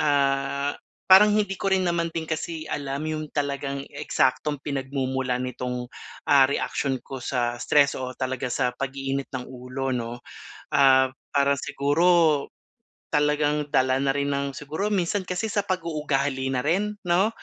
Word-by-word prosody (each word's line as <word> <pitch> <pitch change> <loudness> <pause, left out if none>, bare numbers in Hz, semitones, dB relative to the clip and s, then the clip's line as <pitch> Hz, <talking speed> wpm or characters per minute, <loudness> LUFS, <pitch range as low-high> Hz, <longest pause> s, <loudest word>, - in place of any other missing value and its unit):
ah, 140 0 +1 0.3
parang 190 +3 +8
hindi 205 -2 +1
ko - - 0
rin 190 -1 +2
naman 170 -1 0
din 165 - -1
kasi 160 0 -4
alam 140 +1 -3
yung 155 -1 -3
talagang 140 -1 -3
eksaktong 135 +3 0
pinagmumulan 130 -2 -2
nitong, 125 -1 -4 0.3
ah, 135 -2 +6
reaction 140 -1 -1
ko 135 -1 -7
sa 120 -1 -1
stress 145 -1 +4
o 130 0 -5
talaga 130 0 -2
sa 125 0 0
pag-iinit 135 0 -3
ng 125 -2 -5
ulo 130 +1 -4
'no. 120 0 -4 0.4
Ah, 130 -1 +5 0.2
parang 140 0 +3
siguro, 145 +4 0 1.1
talagang 150 0 +1
dala 130 -2 +2
na 140 - +1
rin 140 +1 +1
ng 140 -1 -2
siguro 155 +8 -3
minsan 200 0 0
kasi 185 +3 -3
sa 210 -1 0
pag-uugali 150 -8 -1
na 125 -1 -1
rin, 205 +6 0
'no? 180 +4 +3
140 Hz, 145 wpm, -25 LUFS, 130-155 Hz, 1.1 s, parang